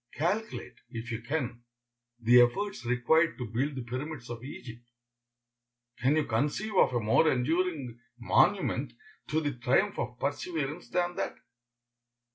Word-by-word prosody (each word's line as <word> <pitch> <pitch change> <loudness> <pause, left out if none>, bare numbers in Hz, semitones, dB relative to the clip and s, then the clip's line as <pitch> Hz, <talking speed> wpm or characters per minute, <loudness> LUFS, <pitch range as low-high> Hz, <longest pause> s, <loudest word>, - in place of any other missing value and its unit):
Calculate, 205 +8 -2
if 120 0 -6
you 115 0 -3
can, 125 -2 -3 0.6
the 120 +1 +7
efforts 195 +5 +1
required 155 +7 +3
to 125 - -4
build 130 +6 -1
the 130 - -4
pyramids 125 +1 -5
of 120 0 -7
Egypt. 120 -4 -9 1.2
Can 130 +4 +3
you 155 - +2
conceive 150 - -1
of 130 - +4
a - - +3
more 115 +9 +4
enduring 140 -2 -1 0.2
monument 115 - +2 0.3
to 155 - +1
the 145 -2 -1
triumph 125 +1 +1
of 120 +1 -3
perseverance 150 +2 -3
than 175 0 0
that? - - -2
135 Hz, 135 wpm, -30 LUFS, 120-160 Hz, 1.2 s, the